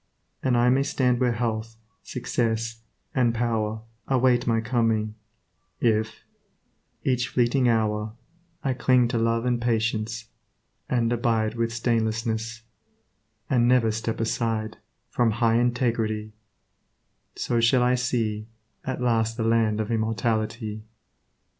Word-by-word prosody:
And 130 -2 +2
I 120 +1 +4
may 130 +2 +3
stand 125 -3 +1
where 125 -2 +2
health, 115 -1 -3 0.2
success, 115 -2 -2 0.3
and 120 -3 +2
power 110 -2 -1 0.3
Await 125 -2 +3
my 115 -1 +3
coming, 115 -2 0 0.7
if, 110 -1 0 0.8
each 125 -2 +1
fleeting 120 +2 +2
hour, 105 -1 0 0.5
I 135 - +1
cling 125 -1 +3
to 120 -2 0
love 115 +1 +1
and 120 -1 +1
patience; 115 -1 -1 0.6
and 120 -2 +1
abide 115 -2 +1
With 115 0 -1
stainlessness; 115 0 -1 0.8
and 120 -3 +3
never 120 -3 +4
step 110 +1 -3
aside 115 -1 -1 0.3
From 120 -2 +2
high 115 +1 +2
integrity; 115 -3 0 1.0
so 120 - 0
shall 125 +2 +4
I 125 +1 +3
see 115 -4 -1 0.4
At 130 -1 -4
last 115 -1 +1
the 115 - -1
land 110 -1 +2
of 110 +1 -2
immortality. 110 0 -1
115 Hz, 120 wpm, -25 LUFS, 110-120 Hz, 1.0 s, I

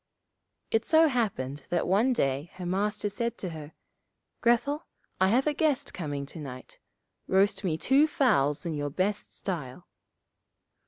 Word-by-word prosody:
It 225 0 +2
so 320 +3 +5
happened 150 - -2
that 175 - 0
one 210 +8 +3
day 140 - 0
her 185 - -6
master 205 +4 -1
said 235 +3 -3
to 185 - -4
her, 155 -1 -9 0.7
'Grethel, 245 +6 +2 0.3
I 190 - +4
have 245 +7 +3
a 300 - +2
guest 300 -3 0
coming 145 -5 -4
to 160 - -9
night; 130 -4 -9 0.5
roast 195 +2 +2
me 165 -5 0
two 270 - +4
fowls 150 - +2
in 165 - -2
your 145 -1 -2
best 190 +7 -2
style.' 165 -4 -5
190 Hz, 150 wpm, -28 LUFS, 150-235 Hz, 0.7 s, so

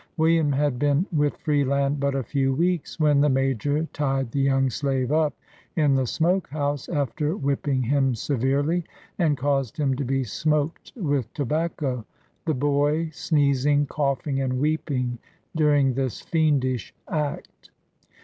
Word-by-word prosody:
William 160 -2 +3
had 140 -2 0
been 145 +4 +2
with 145 -1 +1
Freeland 140 -1 +1
but 140 0 0
a 135 - -1
few 135 0 0
weeks, 170 +1 -1
when 150 -2 +4
the 150 - +4
Major 135 +2 +1
tied 135 -4 -1
the 140 - -1
young 135 -1 +3
slave 135 -1 -1
up 155 -2 +2 0.4
in 150 -4 +3
the 130 -2 +1
smoke 175 +8 +1
house, 145 -2 -2
after 150 - -1
whipping 140 -1 0
him 135 0 +2
severely, 140 +7 0 0.4
and 155 -5 +2
caused 135 +1 -1
him 140 -4 +1
to 140 - -2
be 135 +1 0
smoked 150 - -1
with 145 - -1
tobac 155 +4 -1
co, 130 -6 -2 0.4
the 155 -3 +1
boy 145 +4 +1
sneezing, 145 -2 +2
coughing 140 -1 -1
and 130 -1 -1
weeping 135 -5 -1 0.4
during 145 -4 +3
this 130 -2 -2
fiendish 140 -7 0
act. 150 -2 -4
145 Hz, 145 wpm, -24 LUFS, 135-150 Hz, 0.4 s, when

